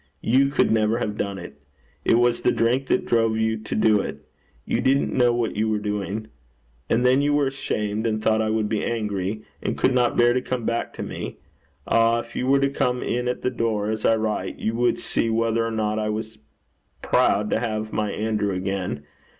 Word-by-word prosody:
You 135 Hz, +4 st, +4 dB
could 140 Hz, -, +2 dB
never 110 Hz, 0 st, +2 dB
have 105 Hz, -3 st, -2 dB
done 100 Hz, -2 st, -3 dB
it. 75 Hz, -6 st, -10 dB, 0.4 s
It -, -, +4 dB
was 120 Hz, 0 st, +2 dB
the -, -, +3 dB
drink 125 Hz, +4 st, +1 dB
that -, -, +1 dB
drove 115 Hz, -1 st, +2 dB
you 110 Hz, 0 st, +1 dB
to 110 Hz, 0 st, -5 dB
do 110 Hz, -1 st, +4 dB
it. -, -, -7 dB, 0.4 s
You -, -, 0 dB
didn't 135 Hz, +1 st, +2 dB
know 125 Hz, -2 st, +4 dB
what 120 Hz, -1 st, -1 dB
you 110 Hz, +1 st, 0 dB
were 110 Hz, -, +1 dB
doing. 105 Hz, +1 st, -3 dB, 0.6 s
And 120 Hz, +2 st, +2 dB
then 130 Hz, +2 st, +4 dB
you 145 Hz, 0 st, +2 dB
were 145 Hz, -1 st, +3 dB
ashamed, 110 Hz, -5 st, -2 dB
and 110 Hz, -1 st, 0 dB
thought 110 Hz, 0 st, +2 dB
I 110 Hz, -, 0 dB
would 110 Hz, -1 st, 0 dB
be 105 Hz, -1 st, -1 dB
angry, 105 Hz, -2 st, -2 dB, 0.2 s
and -, -, -2 dB
could 130 Hz, -, +2 dB
not 125 Hz, -1 st, +2 dB
bear 120 Hz, 0 st, +5 dB
to 130 Hz, -, 0 dB
come 125 Hz, -2 st, -3 dB
back 115 Hz, 0 st, -1 dB
to -, -, -5 dB
me. -, -, -6 dB, 0.5 s
Ah, 115 Hz, 0 st, +3 dB
if 115 Hz, -, -14 dB
you 125 Hz, -, -1 dB
were 135 Hz, +1 st, +4 dB
to 140 Hz, -, +3 dB
come 125 Hz, -2 st, 0 dB
in 125 Hz, +1 st, -1 dB
at 125 Hz, -, -2 dB
the 125 Hz, -, +1 dB
door, 110 Hz, -3 st, -1 dB
as 110 Hz, 0 st, -4 dB
I 115 Hz, -, +4 dB
write, 110 Hz, -1 st, -2 dB
you 110 Hz, -, -2 dB
would 120 Hz, +1 st, +1 dB
see 115 Hz, -, -1 dB
whether 115 Hz, 0 st, +1 dB
or 115 Hz, -, -1 dB
not 110 Hz, -1 st, -1 dB
I 105 Hz, 0 st, -1 dB
was 110 Hz, +1 st, -5 dB, 0.6 s
proud 105 Hz, +1 st, +2 dB
to -, -, +2 dB
have 110 Hz, -2 st, -3 dB
my 105 Hz, -1 st, 0 dB
Andrew 105 Hz, -2 st, -1 dB
again. 95 Hz, -5 st, -3 dB
110 Hz, 215 wpm, -24 LUFS, 105-120 Hz, 0.6 s, bear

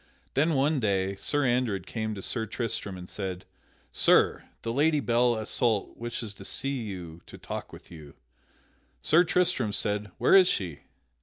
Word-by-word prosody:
Then 155 Hz, +3 st, +2 dB
one 140 Hz, +2 st, +2 dB
day 100 Hz, -3 st, 0 dB
Sir 145 Hz, +7 st, 0 dB
Andred 120 Hz, -7 st, 0 dB
came 110 Hz, +1 st, -3 dB
to 95 Hz, -, -7 dB
Sir 115 Hz, -3 st, -2 dB
Tristram 105 Hz, -4 st, -3 dB
and 90 Hz, 0 st, -9 dB
said: 95 Hz, -3 st, -5 dB, 0.5 s
"Sir, -, -, +4 dB, 0.2 s
the 115 Hz, -, -2 dB
Lady 150 Hz, +3 st, +3 dB
Belle 120 Hz, -2 st, +2 dB
Isoult 110 Hz, -1 st, 0 dB
wishes 120 Hz, -2 st, -5 dB
to 100 Hz, -, -12 dB
see 135 Hz, +6 st, -2 dB
you 90 Hz, -6 st, -7 dB
to -, -, -11 dB
talk -, -, -6 dB
with -, -, -14 dB
you." 75 Hz, -4 st, -12 dB, 0.9 s
Sir 170 Hz, +3 st, +6 dB
Tristram 165 Hz, -11 st, +1 dB
said, 105 Hz, 0 st, -2 dB
"Where -, -, +3 dB
is 190 Hz, -2 st, +8 dB
she?" 90 Hz, -, -1 dB
110 Hz, 160 wpm, -28 LUFS, 95-135 Hz, 0.9 s, is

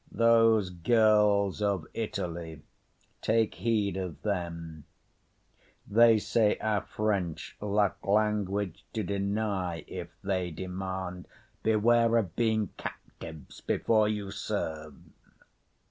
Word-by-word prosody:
Those 115 Hz, -4 st, +4 dB
girls 105 Hz, +1 st, +3 dB
of 100 Hz, -6 st, 0 dB
Italy, 85 Hz, -7 st, -4 dB, 0.6 s
take 110 Hz, -1 st, +2 dB
heed 105 Hz, -5 st, 0 dB
of 90 Hz, -4 st, -5 dB
them; 85 Hz, -6 st, -4 dB, 1.0 s
They 115 Hz, +2 st, +6 dB
say 105 Hz, +1 st, +2 dB
our 105 Hz, -2 st, 0 dB
French 100 Hz, -6 st, -2 dB
lack 105 Hz, -1 st, 0 dB
language 100 Hz, -2 st, 0 dB
to 110 Hz, -, -1 dB
deny 100 Hz, -3 st, -2 dB
If -, -, -6 dB
they 95 Hz, -2 st, -1 dB
demand; 95 Hz, +1 st, -5 dB, 0.3 s
beware 115 Hz, +1 st, +3 dB
of 95 Hz, -8 st, -1 dB
being 110 Hz, -4 st, +1 dB
captives 80 Hz, -3 st, -9 dB
Before 110 Hz, -2 st, +2 dB
you 105 Hz, -2 st, -3 dB
serve. 80 Hz, -5 st, -4 dB
100 Hz, 100 wpm, -29 LUFS, 90-110 Hz, 1.0 s, They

